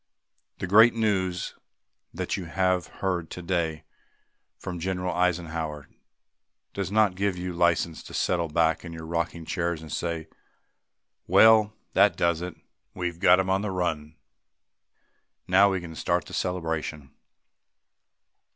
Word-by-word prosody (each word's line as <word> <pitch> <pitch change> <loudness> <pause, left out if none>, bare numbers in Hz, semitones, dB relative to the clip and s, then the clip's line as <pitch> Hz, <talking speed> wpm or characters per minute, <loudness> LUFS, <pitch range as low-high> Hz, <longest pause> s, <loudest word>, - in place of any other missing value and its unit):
The - - -3
great 110 +6 +6
news 95 -5 0 0.6
that - - -3
you 95 - -5
have 90 0 0 0.2
heard 90 -4 -1
today 85 -3 -2 0.7
from 90 -1 -6
General 90 +1 -2
Eisenhower 80 -4 -2 0.8
does 100 -1 -3
not 105 -2 +3
give 95 0 -1
you 90 0 -4
license 85 -1 +1
to - - -11
settle 85 -2 0
back 80 +1 +1
in 85 -2 -8
your 80 -1 -8
rocking 85 0 -3
chairs 85 -2 -2
and 80 0 -11
say, 85 -2 -3 1.0
"Well, 110 -1 +6 0.2
that - - +4
does 85 -1 +1
it. 90 -1 -5 0.4
We've 85 -2 -3
got 90 +1 +6
'em 95 0 0
on 95 +1 +2
the 105 - -2
run. 80 -5 -2 1.3
Now 100 +2 +5
we 95 - -1
can 85 -2 -9
start 85 +2 -1
the - - -12
celebration." 80 -5 -3
90 Hz, 135 wpm, -26 LUFS, 80-95 Hz, 1.3 s, great